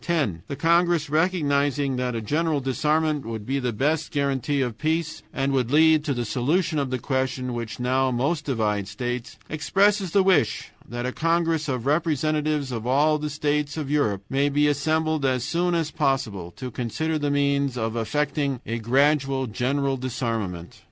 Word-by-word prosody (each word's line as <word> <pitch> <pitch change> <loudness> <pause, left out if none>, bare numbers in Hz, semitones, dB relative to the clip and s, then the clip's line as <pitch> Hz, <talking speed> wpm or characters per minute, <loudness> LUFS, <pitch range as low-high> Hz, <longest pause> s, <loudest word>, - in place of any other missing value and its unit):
"10. 140 - 0
The 140 - -4
congress, 170 -1 +2
recognizing 145 -5 +1
that 125 -1 -1
a 115 - -2
general 155 +5 0
disarmament 150 +3 0
would 110 -2 -6
be 135 +3 -1
the 125 -2 -1
best 150 +8 0
guarantee 140 0 0
of 120 -4 -3
peace 160 +1 -1
and 135 0 -1
would 125 -3 +1
lead 155 +1 +5
to 140 -4 0
the 120 -1 -2
solution 150 - 0
of 140 -2 -1
the 130 - -1
questions 130 0 -2
which 115 -2 -5
now 130 +2 +1
most 140 +6 -1
divide 105 -7 0
states, 120 +3 -4
expresses 195 +5 +2
the 195 +3 +3
wish 185 - +2 0.2
that 120 +1 -4
a 125 - -1
congress 165 0 0
of 125 -2 -2
representatives 150 -1 0
of 115 -1 -4
all 150 +4 +3
the 150 0 -3
states 150 0 -1
of 145 -3 -3
Europe 105 -10 +1
may 140 +2 +1
be 145 +1 +2
assembled 155 +1 0
as 130 -2 +1
soon 175 +4 0
as 160 -2 -1
possible 115 - -1
to 125 +8 -7
consider 155 +8 -2
the 145 -1 0
means 140 -2 +1
of 115 -1 -2
effecting 140 +3 -1
a 115 +1 -3
gradual 135 +2 +2
general 135 +4 -1
disarmament. 115 -9 -4
140 Hz, 170 wpm, -24 LUFS, 125-155 Hz, 0.2 s, lead